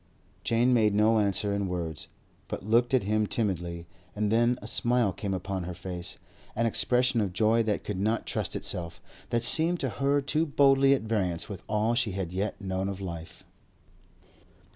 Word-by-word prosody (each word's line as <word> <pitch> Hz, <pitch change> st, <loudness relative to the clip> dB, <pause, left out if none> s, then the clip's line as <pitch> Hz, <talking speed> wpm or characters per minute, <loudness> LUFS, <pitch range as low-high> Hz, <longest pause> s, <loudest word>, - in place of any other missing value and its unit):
Jane 120 Hz, +2 st, +2 dB
made 110 Hz, -4 st, +3 dB
no 110 Hz, +1 st, +4 dB
answer 100 Hz, 0 st, 0 dB
in 100 Hz, -1 st, -1 dB
words, 85 Hz, -4 st, -4 dB, 0.4 s
but -, -, -6 dB
locked 120 Hz, +4 st, +3 dB
at 125 Hz, -, +2 dB
him 105 Hz, +1 st, 0 dB
timidly; 85 Hz, -7 st, -2 dB, 0.3 s
and 105 Hz, 0 st, -1 dB
then 120 Hz, +2 st, +3 dB
a -, -, -11 dB
smile 120 Hz, -2 st, +1 dB
came 100 Hz, -, -4 dB
upon 95 Hz, 0 st, -4 dB
her 90 Hz, 0 st, -6 dB
face, 90 Hz, -1 st, -7 dB, 0.4 s
an 115 Hz, -, +1 dB
expression 125 Hz, +1 st, +2 dB
of 95 Hz, -3 st, -2 dB
joy 110 Hz, +3 st, +3 dB
that 110 Hz, -2 st, -1 dB
could 105 Hz, -3 st, -4 dB
not 110 Hz, +3 st, 0 dB
trust -, -, -3 dB
itself, 85 Hz, -2 st, -3 dB, 0.3 s
that 120 Hz, -1 st, 0 dB
seemed 165 Hz, +8 st, +6 dB
to 135 Hz, -, -1 dB
her 140 Hz, +6 st, +1 dB
too 150 Hz, +4 st, 0 dB
boldly 135 Hz, -1 st, +4 dB
at 135 Hz, -, -4 dB
variance 95 Hz, -7 st, -1 dB
with 100 Hz, -3 st, -8 dB
all 110 Hz, +2 st, +1 dB
she 120 Hz, -4 st, 0 dB
had 95 Hz, -3 st, -4 dB
yet 100 Hz, +2 st, -3 dB
known 95 Hz, -1 st, -3 dB
of 100 Hz, -1 st, -6 dB
life. 85 Hz, -4 st, -8 dB
105 Hz, 180 wpm, -28 LUFS, 95-120 Hz, 0.4 s, seemed